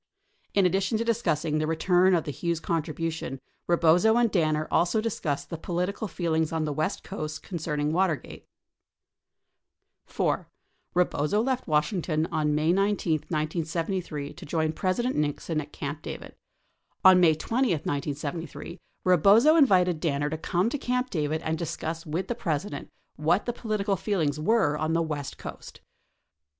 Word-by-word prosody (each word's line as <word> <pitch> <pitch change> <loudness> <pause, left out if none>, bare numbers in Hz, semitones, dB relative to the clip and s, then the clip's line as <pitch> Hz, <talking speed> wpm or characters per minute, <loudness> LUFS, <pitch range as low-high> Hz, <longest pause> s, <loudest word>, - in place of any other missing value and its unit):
In 200 -2 +4
addition 195 +4 +1
to 230 - 0
discussing 165 -10 0
the 155 - 0
return 180 +3 +3
of 165 - +1
the 145 - -4
Hughes 170 +2 -2
contribu 165 0 -2
tion, 135 -5 -6 0.3
Eebozo 175 +7 +4
and 235 -3 +3
Danner 155 -4 +1
also 175 +5 +2
discussed 185 -10 -2
the 165 - -4
(political 180 +5 -2
feelings 160 -3 -1
on 160 -1 -1
the 150 - -2
west 155 +7 -2
coast 155 -5 -5
concerning 150 -4 -2
W 185 +4 +3
atergate. - - -12 1.6
4. - - -1 0.5
Eebozo 180 +4 +2
left 260 -1 -1
Washington 155 0 +1
on 150 -1 +1
May 155 +3 +2
19, 195 -3 +1 0.2
1973, 160 -1 -2
to - - -12
join 160 +1 -1
President 240 +10 0
Nixon 150 +1 -1
at 150 0 -11
Camp 145 +2 -5
David. - - -7 0.7
On 185 -1 +9
May 165 -3 +5
20, 240 +12 0
1973, 155 - -3 0.3
Eebozo 200 - +6
invited 185 - +4
Danner 145 -2 -1
to 160 - -2
come 175 +5 0
to 290 - -2
Camp 250 0 -1
David 155 -1 -1
and 160 0 -1
discuss 165 0 -4
with 170 +5 -2
the - - -1
President 160 -5 -3 0.3
what 165 +6 +2
the 240 - -1
political 215 -4 -1
feelings 165 -7 -1
were 170 -2 +2
on 155 +2 -1
the 165 0 +2
west 150 -3 -4
coast. - - -9
165 Hz, 150 wpm, -27 LUFS, 155-195 Hz, 1.6 s, On